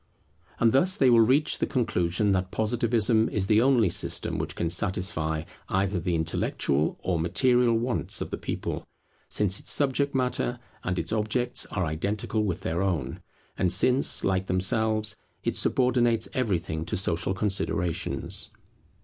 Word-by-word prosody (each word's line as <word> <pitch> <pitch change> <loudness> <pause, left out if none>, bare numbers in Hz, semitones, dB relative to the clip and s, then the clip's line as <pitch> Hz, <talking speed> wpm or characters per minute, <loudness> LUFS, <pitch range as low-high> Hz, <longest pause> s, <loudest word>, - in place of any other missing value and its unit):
And 115 -1 +4
thus 180 +9 +2
they 130 -3 +4
will 115 - +6
reach 135 +7 +2
the - - 0
conclusion 100 -5 0
that 95 -1 0
Positivism 110 +1 +1
is 100 -3 -1
the 105 +2 +4
only 120 -7 +3
system - - -1
which - - -4
can 85 - -1
satisfy 85 -3 0 0.3
either 95 0 0
the 85 0 -1
intellectual 80 -2 -1
or 90 -2 0
material 120 - +2
wants 120 +2 -1
of - - -5
the - - -3
people, - - -4 0.5
since 100 -1 +1
its - - -1
subject 140 0 +2
matter 125 -1 -1 0.3
and 90 0 -2
its - - -3
objects 110 +3 0
are 95 -3 -2
identical 100 +7 -2
with 95 -3 -2
their 85 0 -2
own, 85 -9 -2 0.4
and 90 - +2
since, 130 +2 +3
like 95 0 0
themselves, 105 +3 +1 0.3
it - - -1
subordinates 120 -3 +1
everything 90 - -1
to 85 - -3
social 90 +1 -1
considerations. 90 -3 -1
105 Hz, 150 wpm, -26 LUFS, 90-120 Hz, 0.5 s, will